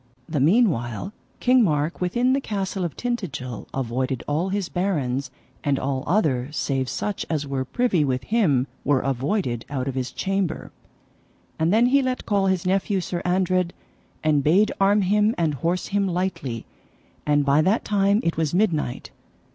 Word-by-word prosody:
The 155 -3 -1
meanwhile 155 - +2 0.3
King 250 -1 +4
Mark 155 -2 0
within 240 +8 +2
the 275 - +1
castle 195 -4 -3
of 170 - -4
Tintagil 150 - -4
avoided 130 0 -2
all 160 +6 0
his 195 -1 -1
barons, 140 -9 -1 0.3
and 140 -1 +1
all 130 -1 -2
other 145 -8 +1
save 135 -3 -1
such 205 -2 -3
as 150 -3 -1
were 135 -1 -2
privy 195 - +1
with 130 -2 -1
him 160 - +2 0.2
were 140 -2 +2
avoided 135 - -1
out 135 -2 -3
of 135 - -2
his 130 -1 -3
chamber. 195 -3 -2 0.9
And 160 +2 +2
then 225 +3 +5
he 275 +3 +4
let 255 -1 -2
call 200 -2 +1
his 190 -2 0
nephew 195 +1 +1
Sir 175 -1 -3
Andred, 180 -1 +1 0.5
and 150 -2 +2
bade 190 +9 +4
arm 200 +2 +4
him 210 +4 +2
and 165 -3 +1
horse 170 +6 -1
him 200 0 +1
lightly; 175 - -2 0.6
and 145 -1 +2
by 140 +2 +4
that 195 +8 +1
time 200 +1 +2
it 165 -1 -1
was 160 0 0
midnight. 165 - 0
170 Hz, 165 wpm, -24 LUFS, 140-200 Hz, 0.9 s, then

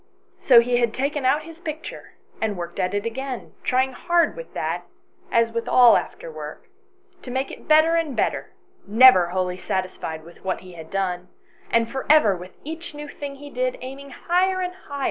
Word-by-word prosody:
So 245 -3 +7
he 245 +1 +1
had 235 -2 +1
taken 280 +1 -1
out 295 +4 +3
his 330 +1 -12
picture 315 -1 -7 0.3
and 215 -3 -1
worked 175 0 -6
at 185 +2 0
it 205 +2 -2
again, 260 +2 -5
trying 260 +1 +1
hard 345 +6 +1
with - - -9
that, - - -2 0.5
as 230 0 +3
with 230 0 -3
all 245 -2 +7
after - - -3
work, - - -8 0.6
to - - -10
make 265 +2 -2
it - - -11
better 315 +1 +5
and 325 -5 0
better, - - -1 0.4
never 215 -4 +7
wholly 180 0 -2
satisfied 185 -4 -4
with 170 +1 -16
what 190 - -2
he 185 -1 -12
had 160 -2 -10
done, 180 -2 -2 0.4
and 230 0 +2
for 265 -1 -4
ever 260 -11 +6
with 180 +1 -11
each 320 +1 -7
new 295 0 -7
thing 285 -1 -7
he 285 +1 -11
did, 255 0 -1
aiming 270 +2 -8
higher 255 - -12
and - - -22
higher; 370 +2 +3
138 370 - -1 0.2
ANYHOW - - -24
STORIES. 285 -1 -6
255 Hz, 205 wpm, -23 LUFS, 195-295 Hz, 0.6 s, So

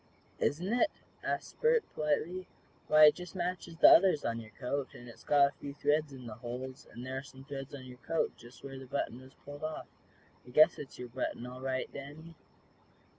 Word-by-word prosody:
"Isn't 180 +8 0
it?" 250 +6 +4 0.3
asked - - -3
Bert, 470 -1 +4
politely. 160 +5 -1 0.4
"Why, 155 0 +8
it 150 - +8
just 180 0 -9
matches 175 -2 -3
the - - +9
others 180 -5 +6
on 115 0 -1
your 110 -1 -10
coat, 135 +4 -4
and 120 - -11
it's 115 - -13
got 140 -1 +5
a - - -19
few 140 0 -7
threads 150 0 +1
in 130 -2 -10
the 115 - -6
holes, 125 +4 -7
and 120 - -8
there 130 +1 -3
are - - -6
some 135 -1 -13
threads 135 0 -7
in 135 - -9
your 125 -1 -11
coat, 165 +5 -1
just 120 +1 -15
where 135 -1 -7
the 130 - -10
button 125 -1 -3
was 130 +1 -15
pulled 145 +1 -9
off. 155 0 -4 0.6
I - - -15
guess 155 +5 +6
it's 140 - -8
your 125 -1 -7
button, 120 0 -3
all 125 +1 -8
right, 130 -1 -1
Danny." 150 +4 -9
140 Hz, 210 wpm, -32 LUFS, 130-155 Hz, 0.6 s, the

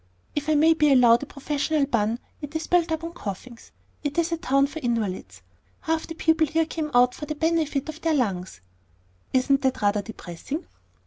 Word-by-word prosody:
"If 295 +1 -2
I 310 - +4
may 320 +2 +5
be 300 -2 +3
allowed 240 -3 +6
a 285 - -6
professional 290 +1 -1
pun, 230 -4 0 0.2
it 295 +1 -8
is 315 - -2
built 345 -2 +2
up 320 0 -2
on 335 0 -5
coughings. 230 - -8 0.3
It 290 +1 -3
is 335 0 +1
a 335 - 0
town 275 -4 +2
for 310 +3 -6
invalids. 195 - -3 0.4
Half 320 0 -1
the 325 - -7
people 320 -1 +2
here 325 +2 +1
came 315 -1 -4
out 250 0 +5
for 300 - -7
the 305 - -3
benefit 315 -3 0
of 315 +1 -7
their 325 -1 +1
lungs." 190 - -2 0.7
"Isn't 270 +1 +2
that 265 -1 0
rather 205 0 +2
depressing?" 225 - -7
290 Hz, 195 wpm, -25 LUFS, 240-320 Hz, 0.7 s, allowed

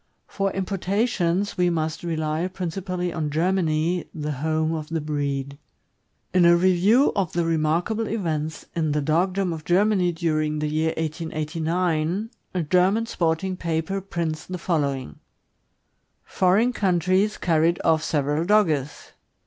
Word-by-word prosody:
For 195 -1 -2
importations 195 0 -1
we 180 0 +4
must 160 -2 -2
rely 160 0 -1
principally 180 -1 -4
on 155 -3 -2
Germany, 165 +1 0
the 150 -1 -3
home 155 +3 0
of 155 -2 -5
the 165 0 -1
breed. 140 -2 -3 0.7
In 180 -1 +4
a 170 0 +7
review 185 +9 +4
of 195 -5 -1
the 170 -1 0
remarkable 165 +8 0
events 160 -7 -3
in 160 -3 0
the 150 - +1
dogdom 180 +4 +1
of 160 -1 -7
Germany 185 0 +2
during 155 -2 -1
the 150 - -1
year 160 +1 0
1889, 160 +4 -1 0.2
a 180 - +1
German 185 +7 +2
sporting 175 -2 -1
paper 170 +3 -2
prints 170 -5 -3
the 180 - -4
following: 140 - -2 1.0
Foreign 205 +7 +2
countries 185 +1 +1
carried 165 0 +2
off 160 -1 +4
several 150 +1 0
Dogges. 165 -8 +1
170 Hz, 130 wpm, -24 LUFS, 155-185 Hz, 1.0 s, a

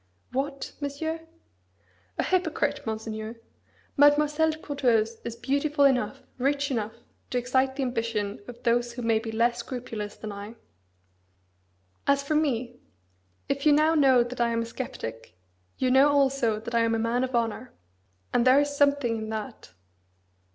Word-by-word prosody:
"What, 275 +1 -3
Monsieur?" 315 +3 -3 1.0
"A - - +1
hypocrite, 360 -9 0
Monseigneur! 220 0 -4 0.6
Mademoiselle 295 +2 +4
de 310 - -3
Courteheuse 240 -7 +1
is 235 -1 -5
beautiful 280 +4 +1
enough, 265 -2 +1 0.2
rich 280 +2 +1
enough, 220 -3 -2 0.3
to 250 - -1
excite 260 +2 +1
the 275 - -1
ambition 230 -5 -2
of 240 0 -11
those 240 0 +1
who 245 0 -6
may 225 -1 +3
be 225 0 -5
less 235 +2 +1
scrupulous 230 -4 -5
than 215 - -7
I. 205 +3 -8 1.5
As 280 0 +3
for 280 - -1
me, 250 -5 0 0.7
if 275 0 -1
you 300 -1 +6
now 310 +2 +4
know 265 -5 +5
that 240 0 -5
I 235 - +3
am 230 0 0
a - - -5
sceptic, 115 - -7 0.4
you 255 -1 +1
know 270 +3 +6
also 270 -6 +2
that 235 +2 -7
I 235 - +3
am 230 0 +2
a - - +1
man 230 +3 0
of 260 -1 -2
honour: 235 +1 -1 0.6
and 240 - +3
there 260 +2 +7
is 285 0 0
something 280 -5 +2
in 220 0 -5
that!" 220 +2 -6
250 Hz, 160 wpm, -27 LUFS, 230-280 Hz, 1.5 s, there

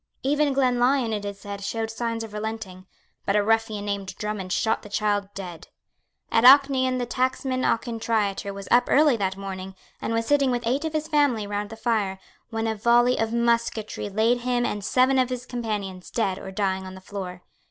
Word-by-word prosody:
Even 290 +2 +2
Glenlyon, 250 -2 +2
it 205 -1 -3
is 200 -1 -5
said, 200 0 -7
showed 225 +2 -2
signs 230 0 -3
of 220 -2 -9
relenting; 210 -4 -5 0.4
but 200 - 0
a 210 - +4
ruffian 220 -1 +1
named 200 -2 -3
Drummond 210 -3 -4
shot 220 +3 +1
the 210 - -12
child 205 -1 0
dead. 180 -4 -7 0.6
At 225 - +3
Auchnaion 260 -1 +6
the 245 - -1
tacksman 255 +1 -1
Auchintriater 225 -4 0
was 200 -1 -8
up 245 +1 +5
early 295 -2 +5
that 190 -2 -1
morning, 190 -1 -6 0.3
and - - -2
was 230 0 0
sitting 280 0 +3
with 240 -1 -1
eight 270 +7 0
of 320 - -3
his 310 0 -1
family 285 -8 +2
round 205 0 -3
the 225 - -8
fire, 215 -4 0 0.3
when 225 -1 -2
a 225 - 0
volley 240 +3 +3
of 225 0 0
musketry 235 -3 0
laid 225 +4 +2
him 245 0 0
and 205 -3 -3
seven 260 +5 +3
of 255 -1 +2
his 250 -1 -4
companions 210 -7 -4
dead 195 -5 -1
or - - -8
dying 190 -1 -1
on 185 - -9
the - - -10
floor. 185 -2 -7
225 Hz, 195 wpm, -25 LUFS, 200-245 Hz, 0.6 s, Auchnaion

